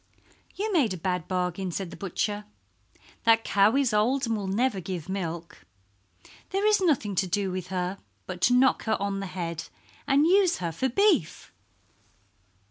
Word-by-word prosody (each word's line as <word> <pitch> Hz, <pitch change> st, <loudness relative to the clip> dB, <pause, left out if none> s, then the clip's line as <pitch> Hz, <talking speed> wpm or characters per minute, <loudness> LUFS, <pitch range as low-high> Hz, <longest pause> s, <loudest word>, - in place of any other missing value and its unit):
"You 420 Hz, +2 st, -2 dB
made 250 Hz, -, +2 dB
a -, -, -7 dB
bad 180 Hz, -1 st, -2 dB
bargain," 180 Hz, 0 st, -2 dB
said 180 Hz, 0 st, -4 dB
the -, -, -8 dB
butcher. 205 Hz, +2 st, -3 dB, 0.8 s
"That 225 Hz, -1 st, +4 dB
cow 200 Hz, +3 st, +3 dB
is 270 Hz, -5 st, +2 dB
old 250 Hz, +6 st, +2 dB
and 230 Hz, -1 st, 0 dB
will 200 Hz, -2 st, -4 dB
never 215 Hz, +2 st, 0 dB
give 180 Hz, -3 st, -5 dB
milk. 170 Hz, -, -5 dB, 0.9 s
There 390 Hz, +2 st, -1 dB
is 425 Hz, -2 st, +4 dB
nothing 270 Hz, -, +1 dB
to 190 Hz, 0 st, 0 dB
do 195 Hz, +1 st, -1 dB
with 185 Hz, -1 st, -4 dB
her 185 Hz, +1 st, -3 dB, 0.3 s
but 180 Hz, -1 st, -7 dB
to 245 Hz, -, +4 dB
knock 260 Hz, +1 st, +3 dB
her 220 Hz, -, 0 dB
on 200 Hz, 0 st, -2 dB
the 195 Hz, -, -4 dB
head 170 Hz, -3 st, -5 dB, 0.4 s
and 285 Hz, +2 st, +4 dB
use 370 Hz, 0 st, +4 dB
her 170 Hz, -2 st, -3 dB
for 260 Hz, +12 st, -1 dB
beef." 355 Hz, -, +1 dB
200 Hz, 170 wpm, -27 LUFS, 180-260 Hz, 0.9 s, That